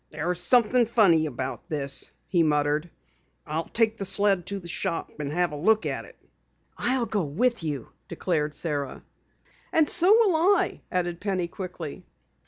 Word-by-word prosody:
"There's 165 +3 -1
something 240 +4 +4
funny 180 -9 +4
about 130 +5 -5
this," 140 -3 -4
he 175 -3 +1
muttered. 150 +1 +1 0.6
"I'll 160 +2 -3
take 225 -1 +1
the 200 - -4
sled 195 -2 +1
to 200 - -2
the 175 - -10
shop 170 0 -2
and 145 -1 -3
have 175 +1 +1
a - - -5
look 215 +9 +2
at - - -3
it." - - -16 0.6
"I'll 250 0 0
go 215 -1 -1
along 150 -1 -6
with 245 -1 +2
you," 145 -6 -4 0.2
declared 150 -4 -2
Sara. 145 -4 -3 0.7
"And 320 -2 +4
so 355 +6 +4
will 430 -5 +5
I," 375 +5 +2
added 175 -1 -1
Penny 190 -4 -1
quickly. 175 -4 -7
175 Hz, 165 wpm, -26 LUFS, 155-220 Hz, 0.7 s, will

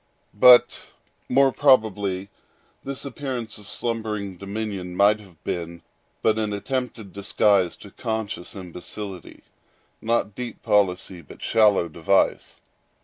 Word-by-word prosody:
But 120 +3 +6 0.4
probably 110 -8 +3 0.5
this 135 0 -5
appearance 125 -5 -5
of 105 - -14
slumbering 110 -4 -3
dominion 100 -2 -5
might 105 +3 +4
have 90 -7 -18
been 85 0 -5 0.4
but 110 0 +3
an 105 -1 -1
attempted 115 -2 -4
disguise 100 -2 +2
to 100 - -13
conscious 110 -6 -4
imbecility—not 100 +4 -6
deep 120 0 -7
policy, 95 -3 +1
but 75 - -13
shallow 105 -6 +4
device. 85 +4 0
105 Hz, 100 wpm, -24 LUFS, 95-115 Hz, 0.5 s, But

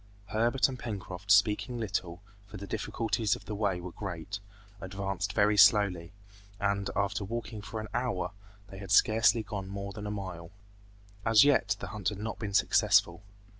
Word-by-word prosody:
Herbert 120 +4 +2
and 130 -2 -7
Pencroft 100 -3 -5
speaking 110 +4 +3
little, 95 -4 -3 0.2
for 100 - -9
the 100 - -7
difficulties 110 0 -1
of - - -13
the 105 - -5
way 100 -3 0
were 90 0 -7
great, 95 +1 -6 0.4
advanced 95 +1 -3
very 105 -1 +3
slowly, 95 -6 +5 0.5
and 100 -1 0
after 100 0 -1
walking 110 +1 -5
for 105 +2 -6
an 110 - -6
hour 120 -7 -1 0.4
they 95 - -10
had 95 -2 -8
scarcely 110 +3 +4
gone 105 -3 -5
more 100 0 -5
than 105 0 -6
a - - -3
mile. 90 -5 -6 0.7
As 110 0 +6
yet 145 -1 +3
the - - -6
hunt 105 -3 -2
had 105 - -7
not 110 +2 -5
been 100 -3 -4
successful. 85 -3 +3
100 Hz, 170 wpm, -30 LUFS, 95-110 Hz, 0.7 s, As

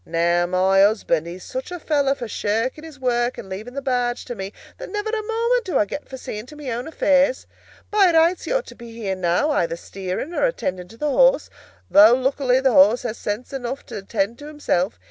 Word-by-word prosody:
Now 170 +1 +1
my 190 +2 +3
husband, 195 -6 +2
he's 180 +2 -8
such 260 +4 -6
a 355 - -5
fellow 285 -3 +1
for 240 - -6
shirking 225 +8 -2
his 320 -3 -11
work 245 -1 0
and - - -8
leaving 215 +7 -7
the 275 - -4
barge 245 -2 -1
to - - -5
me, 195 -3 -6 0.3
that - - -7
never 420 +1 -2
a 445 -1 -1
moment 465 +3 0
do 350 -7 0
I 210 - +3
get 290 +8 -7
for 265 - -7
seeing 215 -2 -7
to 300 - -12
my 290 -4 -6
own 240 +4 -4
affairs. 280 -4 +2 0.5
By 400 -4 +5
rights 330 +2 +3
he - - -4
ought - - +1
to - - -12
be 235 -1 -11
here 210 -4 -3
now, 185 - +1
either 170 - 0
steering 190 - -5
or - - +1
attending 185 - -3
to 225 - -15
the 300 +2 -1
horse, - - +3 0.4
though 215 +4 +7
luckily 260 0 +1
the 265 -2 +2
horse 210 +6 +5
has 230 -2 -4
sense 210 +6 -4
enough 265 0 -4
to - - -7
attend 200 +3 -2
to 295 - -9
himself. 235 -10 -1
245 Hz, 225 wpm, -22 LUFS, 195-295 Hz, 0.5 s, though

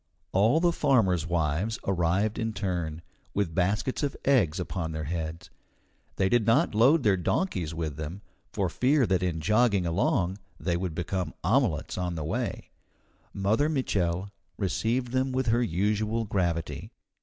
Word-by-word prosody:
All 110 +11 +4
the 175 0 +3
farmers' 110 - +2
wives 85 +6 0
arrived 95 +4 +1
in 115 -1 -1
turn, 85 -6 -3 0.3
with 100 -5 0
baskets 100 +8 0
of 145 -2 -2
eggs 100 - +3
upon 85 -3 -3
their 80 0 -3
heads. 80 +1 -5 0.6
They 95 - +2
did 115 +1 +2
not 115 +2 +3
load 130 +8 +5
their 105 -3 +4
donkeys 90 - -1
with 80 -3 -3
them, 80 +6 -6 0.3
for 95 - 0
fear 130 - +2
that 95 -3 +1
in 85 -3 -1
jogging 105 +1 +3
along 90 +2 0 0.2
they 85 +2 -1
would 85 -2 -3
become 90 -1 -3
omelettes - - +1
on 90 -1 -2
the 80 - -3
way. 80 - -3 0.6
Mother 110 +10 +1
Mitchel 100 - -1 0.3
received 115 +5 0
them 130 +1 0
with 130 0 0
her 120 +2 +3
usual 105 +3 0
gravity. 85 -5 -2
95 Hz, 150 wpm, -28 LUFS, 85-115 Hz, 0.6 s, load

